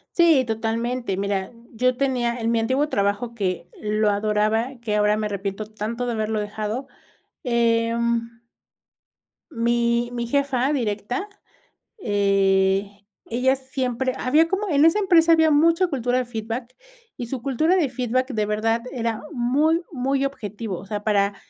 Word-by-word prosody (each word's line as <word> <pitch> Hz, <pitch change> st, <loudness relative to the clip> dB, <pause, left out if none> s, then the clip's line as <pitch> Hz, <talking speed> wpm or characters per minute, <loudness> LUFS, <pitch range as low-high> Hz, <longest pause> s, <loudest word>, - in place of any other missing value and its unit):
Sí, 330 Hz, -6 st, +5 dB
totalmente, 230 Hz, -1 st, -2 dB
mira, 195 Hz, 0 st, -2 dB, 0.2 s
yo 250 Hz, +2 st, +1 dB
tenía, 250 Hz, -3 st, 0 dB
en 225 Hz, 0 st, 0 dB
mi 230 Hz, -, +2 dB
antiguo 260 Hz, +6 st, +1 dB
trabajo 205 Hz, +1 st, -1 dB
que, 185 Hz, -5 st, -3 dB
lo 210 Hz, 0 st, +1 dB
adoraba, 215 Hz, +3 st, +1 dB
que 210 Hz, -2 st, -1 dB
ahora 210 Hz, 0 st, +3 dB
me 215 Hz, 0 st, -2 dB
arrepiento 200 Hz, +1 st, -4 dB
tanto 215 Hz, +3 st, -4 dB
de 245 Hz, -, -2 dB
haberlo 220 Hz, -1 st, -1 dB
dejado, 215 Hz, +5 st, -4 dB, 0.6 s
em 235 Hz, -1 st, 0 dB, 1.1 s
mi 235 Hz, -1 st, +1 dB
mi 235 Hz, -1 st, -3 dB
jefa 275 Hz, 0 st, +1 dB
directa, 240 Hz, -, -2 dB, 0.7 s
eh, 195 Hz, -, +2 dB, 0.3 s
ella 255 Hz, +3 st, +1 dB
siempre 260 Hz, -1 st, -2 dB
había 310 Hz, +6 st, +3 dB
como 400 Hz, +2 st, -1 dB
en 295 Hz, -4 st, +3 dB
esa 330 Hz, +6 st, +5 dB
empresa 340 Hz, -4 st, +4 dB
había 320 Hz, -1 st, +5 dB
mucha 330 Hz, +4 st, +4 dB
cultura 250 Hz, -5 st, -1 dB
de 255 Hz, -, 0 dB
feedback, 230 Hz, +1 st, -5 dB, 0.4 s
y 245 Hz, -4 st, -6 dB
su 255 Hz, 0 st, -4 dB
cultura 280 Hz, +7 st, +1 dB
de 320 Hz, -6 st, +2 dB
feedback 255 Hz, +1 st, -1 dB
de 215 Hz, -1 st, 0 dB
verdad 225 Hz, +2 st, 0 dB
era 230 Hz, -3 st, -2 dB
muy 295 Hz, +6 st, +2 dB
muy 270 Hz, +1 st, 0 dB
objetivo, 215 Hz, -6 st, -5 dB
o 195 Hz, -, -11 dB
sea, 210 Hz, 0 st, -4 dB
para 200 Hz, -1 st, +2 dB
235 Hz, 145 wpm, -23 LUFS, 215-265 Hz, 1.1 s, Sí